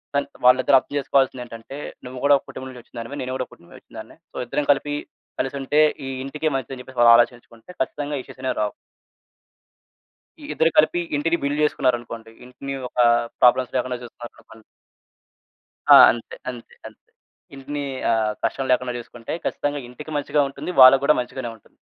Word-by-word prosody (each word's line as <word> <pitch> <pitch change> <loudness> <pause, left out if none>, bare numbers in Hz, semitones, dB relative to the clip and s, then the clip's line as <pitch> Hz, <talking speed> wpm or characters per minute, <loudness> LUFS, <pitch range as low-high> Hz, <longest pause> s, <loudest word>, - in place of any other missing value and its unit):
కానీ 140 0 +1 0.2
వాళ్ళిద్దరూ 130 +1 +5
అర్థం 145 - -11
చేసుకోవాల్సిందేంటంటే, 130 -2 -2 0.3
నువ్వు 125 0 -8
గూడా 145 0 +6
ఒక - - -26
కుటుంబం 130 - -8
నుంచొచ్చినదానివే. 120 +1 -9
నేను 130 0 -4
గూడా 130 - -2
ఓ - - -56
కుటుంబం 85 - -19
నుంచొచ్చినదాన్నే. - - -12
సో, - - -11
ఇద్దరం 145 +4 -2
కలిపి 145 +1 -1 0.5
కలిసుంటే, 135 +2 -1 0.3
ఈ - - -4 0.2
ఇంటికి 150 +3 -2
మంచిదని 130 0 -5
చెప్పేసి 130 -1 -10
వాళ్ళు 115 0 +8
ఆలోచించుకుంటే, 120 +3 -1
ఖచ్చితంగా 145 -3 -3
ఇష్యూసనేవి 130 0 -5
రావు. 105 - -1 1.7
ఈ - - -10
ఇద్దరు 165 +1 +2
కలిపి 165 +3 +4 0.2
ఇంటిని 165 +3 +1
బిల్డ్ 145 +2 0
చేసుకున్నారనుకోండి, 120 -5 -2
ఇంటిని 135 +2 -7
ఒకా 120 -1 +2 0.3
ప్రాబ్లమ్స్ 125 +1 +4
లేకుండా 125 0 -2
చూసుకున్నారనుకోండి. 115 -2 -13 1.3
ఆ! - - +10 0.2
అంతే. 120 - -9
అంతే. 120 -2 -12
అంతే. - - -20 0.6
ఇంటినీ 145 +2 -5 0.3
ఆహ్, 110 -2 +1
కష్టం 135 -1 -1
లేకుండా 125 0 0
చూసుకుంటే 120 -1 -9
ఖచ్చితంగా 145 0 -2
ఇంటికి 150 +5 -10
మంచిగా 145 +1 0
ఉంటుంది. 180 - -7
వాళ్ళకు 135 +2 +8
గూడా 150 - +5
మంచిగానే 125 -1 -6
ఉంటుంది. 110 - -21
130 Hz, 150 wpm, -22 LUFS, 120-140 Hz, 1.7 s, ఆ